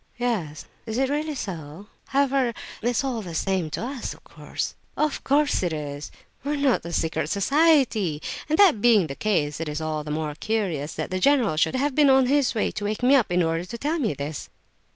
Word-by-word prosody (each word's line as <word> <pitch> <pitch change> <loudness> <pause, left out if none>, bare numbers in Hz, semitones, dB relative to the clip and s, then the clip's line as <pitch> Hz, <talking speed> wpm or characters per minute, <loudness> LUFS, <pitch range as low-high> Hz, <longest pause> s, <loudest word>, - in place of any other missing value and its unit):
"Yes. 210 -12 -2 0.2
Is 220 +1 -3
it 265 +1 +1
really 300 +1 -1
so? 170 - -6 0.2
However, 270 -3 +1 0.3
it's 240 +3 0
all 255 -4 -2
the 175 -5 -7
same 185 -3 0
to 155 - -4
us, 260 -1 -5
of - - -21
course." - - -5 0.2
"Of 305 -1 0
course 290 +1 +2
it 175 -2 0
is; 145 -1 -5 0.3
we 285 +2 -1
are - - -1
not 280 -3 +2
a 170 - -6
secret 160 -2 -1
society; 225 - +3 0.3
and 310 - +2
that 355 - +5
being 220 -6 +5
the 140 - -5
case, 155 -9 0
it 165 -2 -3
is 150 +1 -3
all 155 -1 -3
the 150 - -8
more 150 0 -2
curious 165 -5 -2
that - - -4
the 185 - -1
general 250 - +3
should 160 - +1
have 280 +2 0
been 290 0 +5
on 265 -1 +5
his 275 -1 +2
way 215 - 0
to 205 - -5
wake 215 +3 -3
me 255 +3 +5
up 240 -9 +2
in 180 0 +3
order 165 +1 0
to 235 +6 -7
tell 305 +7 -1
me 220 - 0
this." 145 +2 -5
215 Hz, 215 wpm, -25 LUFS, 160-270 Hz, 0.3 s, that